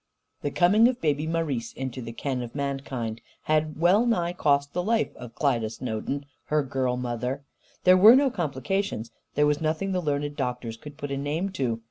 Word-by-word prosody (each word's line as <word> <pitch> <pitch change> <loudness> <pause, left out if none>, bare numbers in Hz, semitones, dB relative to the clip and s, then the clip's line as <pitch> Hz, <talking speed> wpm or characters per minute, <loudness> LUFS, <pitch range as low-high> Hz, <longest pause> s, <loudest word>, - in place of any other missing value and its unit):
The 145 - -1
coming 200 +9 +5
of 250 0 -1
Baby 150 0 0
Marise 150 -8 -2
into 130 -1 -4
the 115 -1 -6
ken 130 +2 -3
of 120 +1 -7
mankind 135 -5 -3 0.2
had 155 0 0
well 190 +8 +4
nigh 175 -7 +1
cost 140 -4 +1
the 180 - 0
life 225 +4 0
of 120 -2 -10
Klyda 120 -8 +1
Snowden, 125 +4 -4 0.2
her 150 -1 +1
girl 130 -2 -1
mother. 125 +2 -3 0.4
There 185 0 +7
were 215 +6 +9
no 275 0 +4
complications; 155 - -2 0.2
there 150 - +4
was 150 +1 +1
nothing 160 +5 0
the 185 -1 0
learned 145 -2 -1
doctors 125 -4 -3
could 145 +4 -11
put 145 -2 -5
a 140 - -1
name 150 +7 -1
to. 125 -9 -1
145 Hz, 185 wpm, -26 LUFS, 125-170 Hz, 0.4 s, were